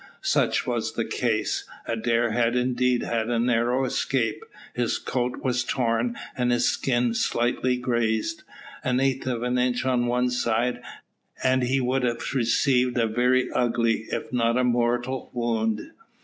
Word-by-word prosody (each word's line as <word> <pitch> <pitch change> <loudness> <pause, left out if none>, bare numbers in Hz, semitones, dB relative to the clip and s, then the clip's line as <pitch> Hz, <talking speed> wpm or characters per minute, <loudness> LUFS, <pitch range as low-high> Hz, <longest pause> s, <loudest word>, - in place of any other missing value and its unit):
Such - - +1
was - - -2
the - - -1
case. - - -1 0.2
Adair 115 +1 0
had 120 +1 +1
indeed 125 0 +1
had 115 -1 -1
a 120 - +1
narrow 120 +2 +1
escape; 125 -3 -1 0.3
his 120 -2 0
coat 125 -1 -3
was 125 -2 +1
torn 120 -1 0 0.2
and 125 -1 +1
his 120 0 +2
skin 120 -2 +1
slightly 120 +2 0
grazed. 120 +5 -1 0.4
An 125 0 +1
eighth 135 -1 0
of 120 -2 -1
an 125 0 0
inch 125 0 0
on 125 -2 +1
one 125 +1 +1
side, 120 0 0 0.6
and 130 0 +3
he 130 +2 +1
would 130 +1 0
have 120 +1 -2
received 125 0 +2
a 115 - +3
very 125 +3 +2
ugly, 115 -2 +1
if - - -4
not 115 0 +2
a 125 - +2
mortal, 120 +1 0
wound. 115 -3 -1
120 Hz, 150 wpm, -25 LUFS, 115-125 Hz, 0.6 s, and